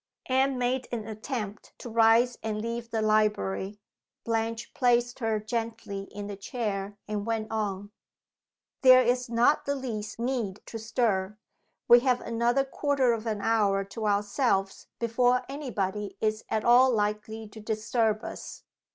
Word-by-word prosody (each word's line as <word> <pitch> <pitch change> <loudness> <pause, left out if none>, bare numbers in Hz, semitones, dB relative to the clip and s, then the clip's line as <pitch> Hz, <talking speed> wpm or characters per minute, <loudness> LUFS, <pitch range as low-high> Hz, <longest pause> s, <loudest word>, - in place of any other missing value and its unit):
Anne 265 +1 +2
made 250 +1 0
an 230 -3 -3
attempt 215 -1 -6
to - - -9
rise 230 +2 +4
and 215 -1 -3
leave 230 +1 -4
the 225 -1 -1
library; 210 -2 +1 0.4
Blanche 230 0 -2
placed 240 -1 +2
her 225 -3 0
gently 220 -3 -4
in 205 0 -6
the 205 0 -5
chair, 200 -1 -4
and 210 -1 -2
went 225 -1 -2
on: 205 -2 -3 0.9
"There 255 -1 +8
is 250 0 0
not 235 +5 +3
the 280 - 0
least 220 -6 -5
need 230 -5 -2
to 225 - -7
stir. 210 -3 0 0.5
We 240 - +9
have 250 0 +2
another 235 +3 +1
quarter 270 -3 +1
of 230 0 -4
an 215 -2 -2
hour 205 -3 +2
to 210 +3 -4
ourselves 205 -1 0
before 245 +2 +2
any 280 0 -6
body 200 -1 -3
is 215 0 -1
at 220 0 -1
all 250 +2 +7
likely 215 0 -1
to 220 - -11
disturb 220 0 0
us. - - -8
225 Hz, 150 wpm, -28 LUFS, 210-245 Hz, 0.9 s, We